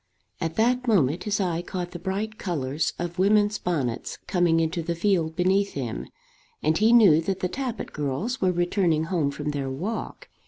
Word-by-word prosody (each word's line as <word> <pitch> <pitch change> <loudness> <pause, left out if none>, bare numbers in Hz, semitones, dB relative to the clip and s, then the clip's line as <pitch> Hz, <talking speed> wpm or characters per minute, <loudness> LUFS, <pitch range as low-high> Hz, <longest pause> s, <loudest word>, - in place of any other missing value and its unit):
At 165 0 -2
that 250 +4 +2
moment 170 - +2
his 210 -1 0
eye 175 -3 0
caught 175 0 -5
the 175 - -7
bright 205 +4 -3
colours 150 -4 -1
of 175 +1 -5
women's 205 +1 +3
bonnets 140 -10 -2
coming 175 -3 +2
into 165 +1 0
the 170 +1 -2
field 170 -3 +1
beneath 190 +3 +2
him, 125 -5 -4 0.6
and 155 +1 +2
he 215 +6 +4
knew 200 -10 +7
that 190 +3 -3
the 180 - +1
Tappitt 250 +2 -4
girls 150 - -2
were 185 -1 +3
returning 175 -2 +1
home 165 -4 0
from 145 +1 -4
their 140 -2 -3
walk. 215 - -5
175 Hz, 180 wpm, -25 LUFS, 160-205 Hz, 0.6 s, knew